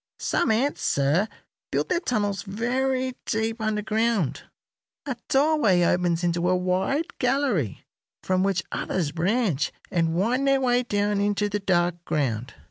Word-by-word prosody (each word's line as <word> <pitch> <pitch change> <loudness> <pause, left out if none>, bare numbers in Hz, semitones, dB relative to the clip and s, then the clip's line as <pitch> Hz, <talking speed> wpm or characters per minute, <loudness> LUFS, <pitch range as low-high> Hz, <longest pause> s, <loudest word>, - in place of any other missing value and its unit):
Some - - 0
ants, 245 +6 +1
sir, 145 +9 +2 0.4
build - - -1
their 350 - +2
tunnels 205 - -1
very 255 +5 -1
deep 220 0 -1
underground. 215 - 0 0.6
A 270 -3 -2
doorway 270 - +3
opens 175 -1 +1
into 175 0 +1
a 185 - +3
wide 185 - -1
gallery, 250 - 0 0.4
from 185 0 +1
which 195 -2 +1
others 165 -6 -2
branch 175 - 0 0.2
and 165 -2 +1
wind 245 +9 +1
their 275 0 +4
way 250 -1 +2
down 205 -3 0
into 205 0 +1
the 205 0 -1
dark 175 -3 0
ground. 130 -7 -2
205 Hz, 135 wpm, -25 LUFS, 175-245 Hz, 0.6 s, their